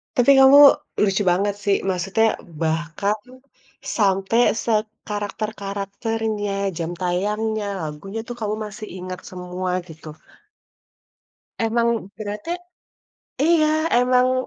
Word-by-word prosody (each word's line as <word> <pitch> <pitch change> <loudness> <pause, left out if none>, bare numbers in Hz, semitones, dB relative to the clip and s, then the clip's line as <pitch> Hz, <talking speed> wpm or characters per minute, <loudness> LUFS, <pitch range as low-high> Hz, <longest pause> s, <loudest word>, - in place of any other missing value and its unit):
Tapi 245 +3 +5
kamu 270 +2 +8 0.4
lucu 195 0 +2
banget 200 +3 +1
sih, 200 -1 +3
maksudnya 195 +5 +1 0.3
bahkan 165 +6 -1 0.8
sampe 195 +1 +2 0.3
sekarakter-karakternya, 210 0 -3 0.3
jam 170 0 -3
tayangnya, 210 +4 -1 0.2
lagunya, 160 +8 -6
tuh 240 - -5
kamu 210 0 -1
masih 210 +1 -8
ingat 185 0 -6
semua, 180 0 -4 0.2
gitu. 160 -1 -12 1.6
Emang 230 -3 0
berarti 210 +8 -5 0.9
iya, 315 0 +3
emang 255 +1 +2
205 Hz, 90 wpm, -22 LUFS, 190-225 Hz, 1.6 s, kamu